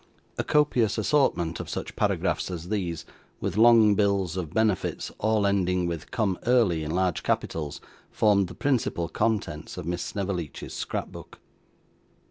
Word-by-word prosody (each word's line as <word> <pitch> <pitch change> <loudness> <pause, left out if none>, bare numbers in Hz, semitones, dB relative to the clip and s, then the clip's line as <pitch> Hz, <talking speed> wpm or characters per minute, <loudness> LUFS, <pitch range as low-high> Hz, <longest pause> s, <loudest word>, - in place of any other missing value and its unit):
A - - +1
copious 125 -8 +2
assortment 110 - +1
of - - -6
such - - -5
paragraphs - - 0
as 90 -1 -6
these, 90 -6 -2 0.3
with - - -3
long 110 -1 +6
bills 100 -4 +1
of 85 -5 -4
benefits 110 -4 0
all 110 -1 +2
ending 90 -2 +1
with 85 -2 -4
'Come 105 -6 -1
Early', 110 -11 +3
in 75 - -4
large 90 +2 0
capitals, 75 -3 -2 0.3
formed 100 -3 +3
the 90 - -10
principal 120 -11 0
contents 85 -9 -2
of 90 - -5
Miss 90 +1 -2
Snevellicci's 90 -7 -4
scrapbook. - - -5
95 Hz, 140 wpm, -26 LUFS, 85-110 Hz, 0.3 s, long